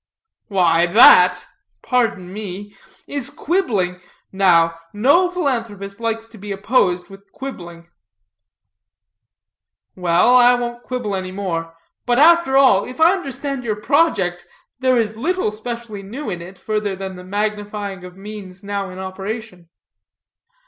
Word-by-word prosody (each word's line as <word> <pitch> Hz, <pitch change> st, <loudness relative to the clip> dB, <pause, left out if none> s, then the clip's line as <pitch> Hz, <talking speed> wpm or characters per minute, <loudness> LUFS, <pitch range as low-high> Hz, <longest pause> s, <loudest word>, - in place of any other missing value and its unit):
"Why, 175 Hz, -4 st, +3 dB
that 180 Hz, -3 st, +7 dB, 0.4 s
pardon 200 Hz, -7 st, -1 dB
me 205 Hz, 0 st, -7 dB, 0.3 s
is 280 Hz, -2 st, -3 dB
quibbling. 225 Hz, -, -1 dB, 0.3 s
Now, 165 Hz, -4 st, +3 dB
no 285 Hz, -, +3 dB
philanthropist 230 Hz, -, -3 dB
likes 225 Hz, -1 st, -2 dB
to 225 Hz, -1 st, -16 dB
be 205 Hz, +1 st, -7 dB
opposed 195 Hz, -3 st, 0 dB
with 195 Hz, +1 st, -15 dB
quibbling." 170 Hz, -11 st, -9 dB, 2.1 s
"Well, 180 Hz, +6 st, +3 dB
I 245 Hz, 0 st, +7 dB
won't 240 Hz, 0 st, -4 dB
quibble 245 Hz, -6 st, -4 dB
any 185 Hz, -1 st, -4 dB
more. 165 Hz, -4 st, -4 dB, 0.3 s
But, 240 Hz, 0 st, +2 dB
after 325 Hz, -2 st, +5 dB
all, 255 Hz, -8 st, +5 dB
if 255 Hz, -, -10 dB
I 330 Hz, +3 st, +6 dB
understand 275 Hz, -6 st, -4 dB
your 220 Hz, -3 st, -1 dB
project, 205 Hz, -, +1 dB, 0.4 s
there 255 Hz, -1 st, +2 dB
is 220 Hz, -1 st, -1 dB
little 335 Hz, -, -1 dB
specially 220 Hz, -1 st, -7 dB
new 220 Hz, +4 st, -6 dB
in 175 Hz, -2 st, -5 dB
it, 185 Hz, +2 st, -11 dB
further 210 Hz, -2 st, -2 dB
than 190 Hz, 0 st, -6 dB
the 180 Hz, -, -10 dB
magnifying 205 Hz, -1 st, -4 dB
of 180 Hz, 0 st, -11 dB
means 195 Hz, -2 st, -10 dB
now 200 Hz, -1 st, -3 dB
in 185 Hz, -, -10 dB
operation." 190 Hz, -1 st, -7 dB
205 Hz, 130 wpm, -19 LUFS, 185-245 Hz, 2.1 s, that